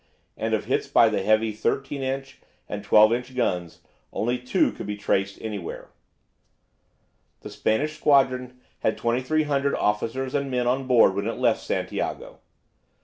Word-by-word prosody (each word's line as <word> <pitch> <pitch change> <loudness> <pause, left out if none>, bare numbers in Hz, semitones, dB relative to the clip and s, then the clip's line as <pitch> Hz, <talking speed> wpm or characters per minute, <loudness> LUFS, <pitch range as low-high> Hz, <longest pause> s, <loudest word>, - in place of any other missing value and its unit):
And - - -1
of - - -4
hits - - 0
by - - +5
the - - -1
heavy 110 +2 +2
13 135 +6 -2
inch 135 0 -4 0.3
and 105 -1 -5
12 105 +2 +6
inch 125 +2 -4
guns, 90 -9 -2 0.3
only 120 +2 -1
two 125 +1 +1
could - - -8
be 105 0 -4
traced 100 -1 -1
anywhere. 105 -6 -6 1.5
The - - -9
Spanish 150 +8 -1
squadron 130 -4 +2 0.2
had 110 - 0
2300 140 +3 0
officers 115 +5 -1
and 140 -1 -1
men 125 -1 0
on 130 +2 0
board 120 -6 +5
when 100 +2 -2
it 115 - -3
left 120 -3 +2
Santiago. - - -4
125 Hz, 145 wpm, -25 LUFS, 110-135 Hz, 1.5 s, 12